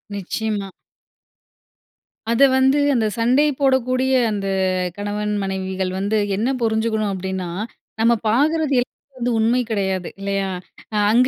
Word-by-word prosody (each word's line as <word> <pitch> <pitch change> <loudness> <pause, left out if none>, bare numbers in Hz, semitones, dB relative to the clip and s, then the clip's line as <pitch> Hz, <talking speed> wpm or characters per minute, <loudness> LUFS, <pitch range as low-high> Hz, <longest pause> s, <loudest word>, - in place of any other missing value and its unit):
நிச்சயமா. 205 +1 -3 1.6
அத 235 - +1 0.2
வந்து 265 +2 +4 0.2
அந்த 230 -3 +2
சண்டை 250 +6 +3
போடக்கூடிய 260 -1 +2 0.2
அந்த 200 -2 -2 0.5
கணவன் 210 +1 -2
மனைவிகள் 190 -1 -2
வந்து, 205 +3 0 0.2
என்ன 220 +6 0
புரிஞ்சுக்கணும், 220 -2 0
அப்படீன்னா, 190 -1 -3 0.5
நம்ம 230 +1 +5 0.2
பாக்குறது 300 +5 +2
எல் 245 - -3 0.3
வந்து 245 0 -1
உண்மை 235 +3 +3
கிடையாது, 190 -4 -1
இல்லையா? 195 0 -1 0.4
அ - - -2 0.2
அங்க 245 +3 +5
220 Hz, 115 wpm, -21 LUFS, 195-250 Hz, 1.6 s, நம்ம